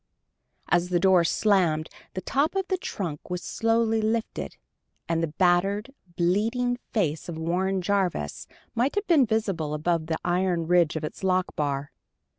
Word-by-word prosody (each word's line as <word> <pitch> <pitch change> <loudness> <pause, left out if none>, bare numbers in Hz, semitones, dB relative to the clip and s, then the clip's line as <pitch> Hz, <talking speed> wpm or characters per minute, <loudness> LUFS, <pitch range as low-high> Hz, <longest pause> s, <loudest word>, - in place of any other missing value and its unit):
As 175 +1 +2
the 175 -1 +2
door 185 -1 +5
slammed, 170 -4 +2 0.3
the 185 - -2
top 280 - 0
of 385 -1 0
the 375 - +1
trunk 170 - -5
was 180 0 -3
slowly 225 -1 +1
lifted, 220 +1 -2 0.5
and 165 0 0
the 165 - +1
battered, 190 - +1 0.2
bleeding 230 +8 +1
face 165 -7 -1
of 165 - -5
Warren 185 +3 0
Jarvis 180 - -1 0.3
might 250 - 0
have 410 +1 0
been 310 -9 +4
visible 195 -9 -1
above 160 +1 0
the 160 -1 -1
iron 175 -1 +1
ridge 175 -2 +3
of 160 - -3
its 155 - -6
lock 185 -1 +1
bar. 145 -1 -2
185 Hz, 155 wpm, -26 LUFS, 165-220 Hz, 0.5 s, door